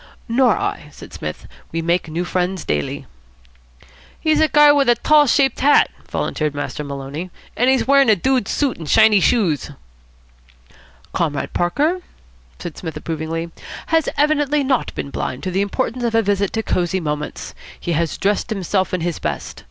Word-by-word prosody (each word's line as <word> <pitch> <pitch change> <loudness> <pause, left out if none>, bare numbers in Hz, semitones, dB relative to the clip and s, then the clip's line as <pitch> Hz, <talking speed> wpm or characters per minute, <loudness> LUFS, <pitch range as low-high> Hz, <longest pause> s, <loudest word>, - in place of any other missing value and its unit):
"Nor 250 +2 +3
I," - - -3
said - - -13
Psmith. - - -6 0.2
"We 165 0 -2
make 170 0 0
new 170 +3 -2
friends 180 0 -2
daily." 75 -1 -2 1.1
"He's 310 -1 +2
a 315 - +5
guy 295 -1 +6
with 280 -3 +3
a 240 - +6
tall 300 +3 +4
shaped 270 +1 +2
hat," 290 +2 +4 0.2
volunteered 150 -2 -2
Master 145 +1 -4
Maloney, 140 +5 -6 0.3
"an' 245 - +2
he's 265 -1 +3
wearin' 275 -2 +5
a 215 - +6
dude 255 +3 +1
suit 280 -4 -1
an' 160 - -7
shiny 220 +3 +5
shoes." 180 - +1 1.4
"Comrade 150 -4 -2
Parker," 300 - 0 0.6
said 170 - -7
Psmith 160 -3 -6
approvingly, 165 +1 -4 0.4
"has 325 -2 +3
evidently 295 -1 +2
not 265 -1 0
been 140 - -5
blind 130 - -4
to 185 - -2
the 190 +2 +1
importance 245 +4 -2
of 230 -1 0
a 225 - +4
visit 200 -1 0
to 225 - -1
Cosy 180 -1 0
Moments. 150 -3 -4 0.3
He 175 - -3
has 165 0 -1
dressed 205 +4 0
himself 190 -2 -1
in 180 - -3
his 170 -1 -2
best. - - -4
195 Hz, 165 wpm, -20 LUFS, 165-265 Hz, 1.4 s, guy